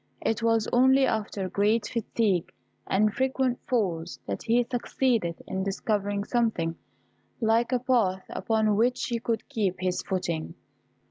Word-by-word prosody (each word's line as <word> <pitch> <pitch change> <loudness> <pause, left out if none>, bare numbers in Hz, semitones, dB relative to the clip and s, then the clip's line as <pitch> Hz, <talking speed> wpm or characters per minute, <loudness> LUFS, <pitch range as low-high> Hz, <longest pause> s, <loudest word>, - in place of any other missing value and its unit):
It 225 - 0
was 225 -1 +2
only 265 +2 +5
after 210 -4 -2
great 205 +4 +1
fatigue 215 -5 0 0.4
and 210 +2 +2
frequent 260 0 0
falls, 180 -9 -1
that 100 -1 -4
he 240 +2 +2
succeeded 235 -7 0
in 190 - -3
discovering 200 0 -1
something 210 -9 0 0.6
like 230 +2 +2
a 250 - +3
path 235 -7 +1
upon 220 -2 +1
which 245 +3 +2
he 235 -2 -2
could 230 0 -2
keep 210 -9 -1
his 185 0 -1
footing. 175 -4 -3
220 Hz, 135 wpm, -27 LUFS, 190-240 Hz, 0.6 s, only